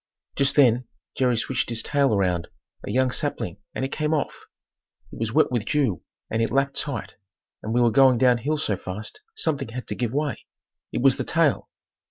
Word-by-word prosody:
Just 140 0 +2
then 125 -3 +4 0.3
Jerry 125 -3 +2
switched 125 +2 -1
his 115 -1 -1
tail 140 -2 +2
around 90 -5 +1 0.4
a - - -6
young 130 +4 +2
sapling 125 - -2 0.2
and 130 - -1
it 135 - -5
came 155 0 0
off. 145 - -3 0.7
It - - -10
was 115 -1 -1
wet 155 +2 +3
with 120 -4 0
dew 130 - 0 0.3
and 110 - -1
it 115 - +1
lapped 140 +2 +1
tight, 140 -6 -4 0.4
and 110 - -4
we 120 +2 +2
were 120 -1 +4
going 130 0 +5
down 125 0 +4
hill 150 +6 -1
so 105 -9 0
fast 100 - -6
something 145 - -1
had 125 +2 -6
to - - -2
give 120 -3 -2
way. 145 +1 -2 0.4
It - - -2
was 135 -2 +5
the - - -1
tail! 165 -4 +1
125 Hz, 200 wpm, -24 LUFS, 115-140 Hz, 0.7 s, going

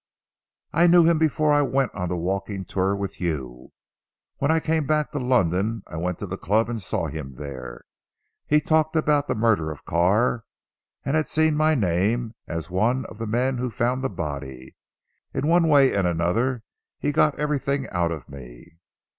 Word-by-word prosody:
"I 170 +3 +5
knew 175 0 +7
him 165 -1 +3
before 155 -1 +2
I 145 - +4
went 135 -2 0
on 90 -2 -3
the 90 - -2
walking 95 +2 -3
tour 95 +2 0
with 100 -1 -5
you. 65 -8 -4 0.7
When 140 - 0
I 160 0 +4
came 160 -2 -1
back 150 -1 +1
to 145 - -3
London 110 -3 +1
I - - -8
went 90 +1 -2
to - - -5
the 95 0 -6
club 110 +3 +1
and 115 -2 -3
saw 95 - -2
him 70 -3 -6
there. 65 -4 -8 0.6
He 150 0 +4
talked 155 +1 +1
about 150 -2 +2
the - - -1
murder 110 -8 +2
of 75 - -9
Carr 105 +7 +2 0.6
and 140 - 0
had 155 -1 0
seen 160 0 +2
my 155 +1 +3
name 110 - 0
as 85 +1 -5
one 120 +8 +1
of 105 - -11
the 115 - -3
men 125 +3 0
who 125 0 -1
found 125 +4 -1
the 135 - 0
body. 70 -7 -6 0.6
In - - -1
one 170 +1 +4
way 140 -3 +5
and 95 -3 +1
another 110 +9 0 0.3
he 145 - -1
got 150 0 +2
everything 140 -2 -1
out 85 -2 0
of 80 -6 -6
me." 70 +3 -13
115 Hz, 185 wpm, -24 LUFS, 85-145 Hz, 0.7 s, knew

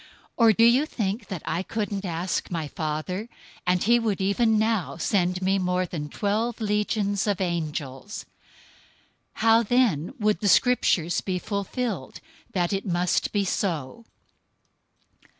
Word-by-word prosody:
026:053 - - -21 0.3
Or 230 -2 +6
do 225 +3 +5
you 250 +5 +5
think 210 -3 -3
that 185 -5 -5
I 165 +3 -1
couldn't 205 +1 -3
ask 175 +1 -2
my 165 -4 -3
Father, 160 +9 -4 0.4
and 180 0 +2
he 240 +2 +4
would 220 -4 -1
even 215 +3 +2
now 215 -5 0
send 180 0 0
me 195 +1 +2
more 180 0 0
than 150 -4 -5
twelve 220 +7 -1
legions 210 -1 0
of 205 -2 0
angels? 160 -2 -3 1.1
026:054 - - -8
How 225 0 +6
then 225 - +1
would 210 -1 +1
the 205 - 0
Scriptures 185 -6 +3
be 185 -2 -2
fulfilled 200 - -3 0.3
that 175 0 0
it 195 - -1
must 175 0 +1
be 205 -2 +1
so?" 175 - -2
195 Hz, 145 wpm, -25 LUFS, 175-220 Hz, 1.1 s, Or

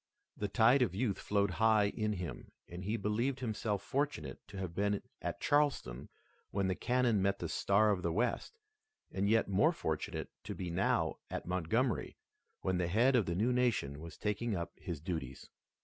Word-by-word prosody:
The 105 - -2
tide 120 +6 +5
of 100 -8 +1
youth 105 -2 0
flowed 100 -1 +1
high 110 -2 +5
in 105 0 -1
him, 85 -10 -6 0.2
and 90 +2 -7
he 105 +4 -1
believed 115 +6 0
himself 105 -4 -2
fortunate 140 +4 -2
to 100 - -9
have 95 -3 -4
been 100 +2 +1 0.2
at - - -3
Charleston 145 - +1 0.4
when 100 -1 0
the 95 - +1
cannon 120 0 +2
met 100 +1 +2
the - - -3
Star 105 +2 +3
of 95 -3 0
the 85 - 0
West, 120 - -1 0.5
and 100 +1 0
yet 110 +1 +3
more 100 +1 +4
fortunate - - -3
to - - -4
be 90 -2 -4
now 85 - +1
at - - -4
Montgomery, 95 +8 0 0.4
when 95 -1 0
the 90 - +1
head 120 +9 +4
of 115 -7 +3
the 85 - -1
new 115 +7 +2
nation 115 - +1
was 85 +1 -9
taking 105 +1 -1
up 85 -1 -3
his 85 -5 -6
duties. 80 -6 -5
100 Hz, 180 wpm, -34 LUFS, 90-115 Hz, 0.5 s, tide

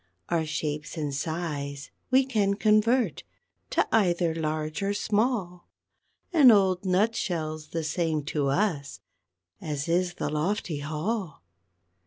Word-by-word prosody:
_ - - +1
_Our 160 -1 0
shapes 150 +1 -3
and 150 -3 -2
size 145 -2 -4 0.2
we 260 +1 +4
can 205 -6 +1
convert 220 +4 +2 0.5
To - - +1
either 175 -5 +2
large 155 0 -2
or 200 +1 0
small, 205 -4 -1 0.6
An 295 -7 +8
old 190 -4 +4
nut 200 +5 +2
shell's 155 -3 -3
the 165 +1 -3
same 155 -1 -1
to 145 -1 -1
us 145 -2 -1 0.6
As 150 0 -3
is 175 +1 +1
the 145 - -3
lofty 155 0 -1
hall. 155 - -3
170 Hz, 130 wpm, -27 LUFS, 155-205 Hz, 0.6 s, An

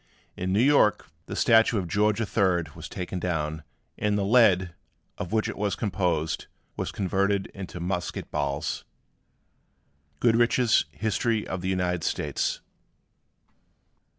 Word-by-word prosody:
In 95 +1 -2
New 105 +5 +3
York, 135 - +3 0.2
the - - -5
statue 115 -1 +4
of 95 -3 -2
George 105 +4 +2
III. 95 -5 +1
was - - -9
taken 90 0 -4
down; 80 -3 -2 0.4
and 105 0 +1
the 100 - 0
lead, 100 -6 +4 0.5
of 90 - -4
which 110 0 +1
it 110 - -4
was 105 -1 0
composed, 85 -6 -1 0.3
was - - -3
converted 100 +1 0
into 95 -2 -7
musket 90 0 -3
balls. 70 -1 -2 1.4
GOODRICH'S 120 -5 +3
HISTORY 110 - -1
OF 95 -1 -4
THE 95 - -2
UNITED 90 -2 0
STATES. - - -1
95 Hz, 125 wpm, -26 LUFS, 90-110 Hz, 1.4 s, statue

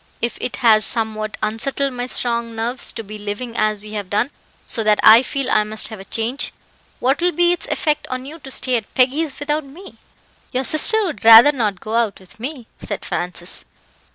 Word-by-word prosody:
If 235 - -3
it 230 - -3
has 215 -2 +6
somewhat 215 -1 -2
unsettled 255 +5 -1
my 245 0 -4
strong 235 -2 -2
nerves 235 +3 -1
to 225 - -6
be 215 +1 -9
living 210 +4 -6
as 215 -1 0
we 210 0 -11
have 205 -3 -5
done, 225 +8 0 0.3
so 225 - -1
that 215 -1 +2
I 220 +2 +9
feel 275 0 -3
I 215 - +3
must 215 +1 +1
have 220 -3 -9
a 195 - -11
change, 230 +7 -2 0.5
what 270 +4 0
will 355 +1 +2
be 345 0 +2
its 355 - -2
effect 300 -2 -1
on 255 0 -5
you 310 +4 -9
to 270 -2 -11
stay 255 -1 0
at 220 - -8
Peggy's 270 +3 +1
without 295 +1 -2
me?" 315 +8 -14 0.5
"Your 255 +1 0
sister 435 - +5
would 335 - -6
rather 230 +5 +9
not 215 -9 -2
go 215 - -6
out 230 -3 0
with 190 +3 -18
me," 260 0 -6
said 205 - -6
Francis. 175 0 -5
235 Hz, 205 wpm, -19 LUFS, 215-275 Hz, 0.5 s, I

